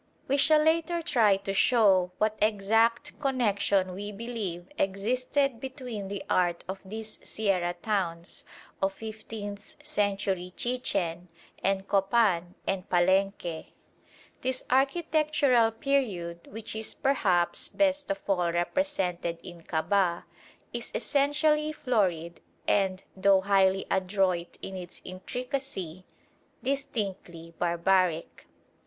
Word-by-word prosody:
We 275 - +2
shall 305 +2 +5
later 335 +2 +2
try 220 - +4
to 195 0 -4
show 195 -5 +4
what 215 0 +1
exact 225 +6 +2
connection 205 -9 +1
we 205 +3 -5
believe 205 -5 -5
existed 250 +6 0
between 250 -6 -6
the 200 0 -5
art 175 -2 +1
of 190 +1 -4
these 215 +2 -7
sierra 185 -5 0
towns, 175 -5 -2 0.4
of 195 0 +1
fifteenth 215 -1 -7 0.2
century 195 -3 -1
Chichen, 190 -9 -1 0.4
and 195 0 +1
Copan 195 -3 +2
and 190 -1 -2
Palenque. 185 -2 +1 0.7
This 260 0 -1
architectural 280 -3 +3
period, 215 -9 -1
which 215 +1 -6
is 220 0 -4
perhaps 185 -11 +1
best 290 -1 +1
of 195 0 -3
all 180 -3 +2
represented 180 - -1
in 175 -2 -10
Kabah, 170 +2 +1 0.5
is - - -4
essentially 300 +2 +2
florid 185 - 0 0.3
and, 190 -2 +2
though 195 0 +4
highly 195 -1 +3
adroit 185 -2 0
in 190 - -5
its 180 -2 -8
intricacy, 190 - -5 0.6
distinctly 200 -11 -3
barbaric. 175 -1 +1
200 Hz, 105 wpm, -28 LUFS, 185-250 Hz, 0.7 s, shall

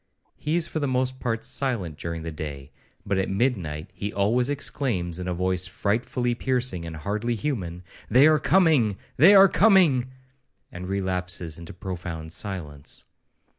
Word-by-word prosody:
He 150 +2 -2
is 170 -2 +1
for 160 - -3
the 145 - 0
most 130 0 0
part 115 -3 -2
silent 115 - -1
during 85 +1 -5
the 80 - -4
day, 75 -3 -7 0.3
but 100 - 0
at 95 - -1
midnight 95 - -1
he 100 +2 -4
always 115 +6 +1
exclaims, 110 - -2
in 90 - -4
a 90 - -1
voice 90 0 0
frightfully 120 +6 -1
piercing, 125 -8 -1
and 80 - -6
hardly 105 +9 -2
human, 95 - -3 0.3
'They 130 +4 +6
are 155 -1 +5
coming! 150 - +3 0.2
they 180 +9 +8
are 195 0 +9
coming!' 175 - +4 0.6
and 90 +1 -7
relapses 90 -4 -2
into 85 - -9
profound 85 -3 -6
silence. 80 -8 -6
100 Hz, 155 wpm, -25 LUFS, 85-130 Hz, 0.6 s, are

